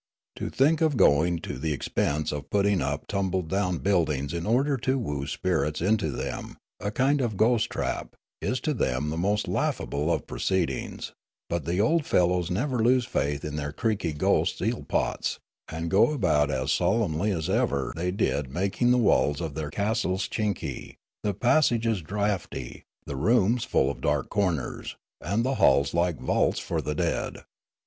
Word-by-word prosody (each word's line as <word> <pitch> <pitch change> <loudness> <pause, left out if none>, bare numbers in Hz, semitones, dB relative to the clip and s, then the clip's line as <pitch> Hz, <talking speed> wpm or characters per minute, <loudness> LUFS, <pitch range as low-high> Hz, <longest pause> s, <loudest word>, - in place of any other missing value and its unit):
To - - -3
think 150 +4 +2
of 155 -5 +2
going 85 +2 +4
to 65 - -6
the 80 +2 -1
expense 75 +2 -1
of 70 -1 -5
put 100 -1 +2
ting 100 -2 +2
up 70 0 -2
tumble 95 -2 -1
down 90 +1 -1
buildings 80 -6 0
in 85 +2 -3
order 135 +5 +2
to 130 +2 0
woo 75 - -3
spirits 80 -4 -1
into 100 +4 +1
them, - - -5 0.2
a 100 - -2
kind 135 +5 +2
of 110 -5 -1
ghost 115 +1 +3
trap, - - -3 0.3
is 130 - -1
to 155 - 0
them 70 - -1
the 80 - -3
most 100 +4 0
laughable 75 +4 -1
of 80 - -1
proceedings; 95 -3 -2 0.4
but 85 -4 -1
the 85 +3 -1
old 150 +8 +2
fellows 90 -1 +2
never 125 +7 -1
lose 125 +2 +3
faith 70 - -1
in 75 0 -4
their 75 -1 -3
creaky 105 -2 -1
ghost 75 - +1
eelpots, - - -1 0.3
and 80 +1 -4
go 110 +8 +5
about 80 - +2
as 65 -1 -1
solemnly 100 - +1
as 85 -5 -1
ever 95 - 0
they 90 +2 -1
did 75 -7 0
making 100 - 0
the 125 - +5
walls 75 -10 +3
of 80 -4 -4
their 75 0 -4
castleschinky, 100 - -2 0.3
the 105 -2 -1
passages 115 - +2
draughty, 95 -7 -3 0.2
the 70 - -5
rooms 115 - +2
full 65 - +2
of - - -10
dark - - 0
corners, 90 -9 -1 0.3
and 105 +6 0
the 135 - +1
halls 70 +1 +4
like 85 -1 +1
vaults - - +1
for - - -2
the 75 - -3
dead. - - -2
95 Hz, 170 wpm, -27 LUFS, 75-110 Hz, 0.4 s, go